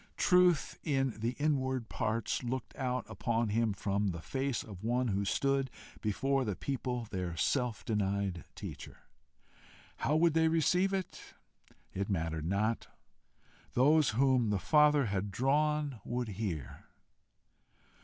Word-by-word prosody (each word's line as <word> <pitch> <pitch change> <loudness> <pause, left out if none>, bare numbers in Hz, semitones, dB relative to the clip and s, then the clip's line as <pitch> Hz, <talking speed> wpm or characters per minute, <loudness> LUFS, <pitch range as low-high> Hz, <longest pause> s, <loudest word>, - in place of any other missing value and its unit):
Truth 180 -3 +3
in 135 -6 0
the 115 +3 -1
inward 130 -5 0
parts 110 0 -1
looked 125 0 -4
out 125 -1 -2
upon 115 -2 -1
him 115 +1 +1
from 100 +1 -1
the 85 -3 -2
face 135 - -2
of 100 -3 -10
one 120 +2 +1
who 100 0 0
stood 135 +4 +1 0.3
before 135 +6 +1
the 105 -5 -2
people 125 -1 -3
their 90 -4 -3
self 125 - 0
denied 100 -5 -1
teacher! - - -9 0.9
How 150 - +1
would 165 0 +4
they 160 0 +4
receive 180 +4 +2
it? 190 -2 -5 0.6
It 100 +1 -2
mattered 80 -4 -1
not. 105 +5 0 0.9
Those 145 +2 +4
whom 130 -4 +3
the 105 - +1
Father 150 +4 +4
had 100 -1 -2
drawn, 145 +2 +1
would 120 -1 -3
hear. 95 - -5
120 Hz, 130 wpm, -32 LUFS, 100-140 Hz, 0.9 s, would